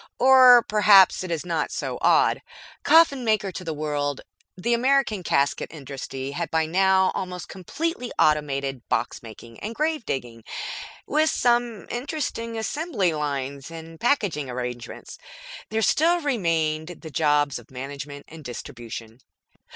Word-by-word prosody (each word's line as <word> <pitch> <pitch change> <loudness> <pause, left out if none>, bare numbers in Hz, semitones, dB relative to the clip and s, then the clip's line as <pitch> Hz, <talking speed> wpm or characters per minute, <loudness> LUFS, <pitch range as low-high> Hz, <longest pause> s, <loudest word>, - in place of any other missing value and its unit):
Or 255 -2 +8
perhaps 205 -3 +6
it 185 - -6
is 165 0 -3
not 170 -3 -1
so - - -4
odd. - - +3 0.4
Coffin 315 -5 +5
maker 215 -4 +1
to 185 - -7
the 165 - -4
world, 145 -2 -2 0.4
the 235 +6 0
American 250 -4 +2
casket 140 -4 0
industry 135 -2 -6
had 170 +3 -3
by 160 0 +1
now 190 +2 +3
almost 180 -1 -5
completely 250 - -4
automated 140 -4 +1
box 120 -1 -1
making 115 0 -12
and 220 +3 -6
gravedigging, 135 - -3 0.6
with 310 +1 +2
some 240 -5 +1
interesting 240 -3 -4
assembly 220 - -1
lines 140 -2 -4
and 165 0 -10
packaging 200 - 0
arrangements; 125 -1 -6 0.5
there 220 0 -1
still 340 +8 +3
remained 165 - -1
the 160 - -9
jobs 145 -3 +1
of 120 - -18
management 140 +2 -8
and 160 0 -12
distribution. 115 -2 -8
165 Hz, 130 wpm, -24 LUFS, 140-230 Hz, 0.6 s, Or